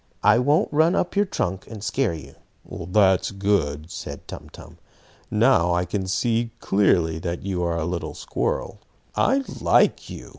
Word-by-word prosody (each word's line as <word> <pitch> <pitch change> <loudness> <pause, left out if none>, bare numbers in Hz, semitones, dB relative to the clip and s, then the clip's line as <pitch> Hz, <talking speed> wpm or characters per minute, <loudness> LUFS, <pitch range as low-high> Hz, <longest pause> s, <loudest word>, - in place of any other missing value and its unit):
I 105 +3 +5
won't 150 - +2
run 160 +4 +4
up 180 - -1
your 205 +1 +3
trunk, 95 - -3
and 110 -3 -9
scare 120 -7 0
you." 70 -3 -11 0.3
"That's 95 +1 +2
good," 90 -6 -1
said - - -8
Tum - - -9
Tum. - - -14 0.5
"Now 85 +1 +3
I 90 +1 0
can 95 +1 -3
see 115 +4 0
clearly 85 -5 +2
that 85 0 -4
you 95 -3 -2
are 85 -1 -1
a 80 - -1
little 85 0 -4
squirrel. - - -3 0.4
I 275 +1 +2 0.2
like - - +3
you! - - -9
95 Hz, 160 wpm, -23 LUFS, 85-115 Hz, 0.5 s, I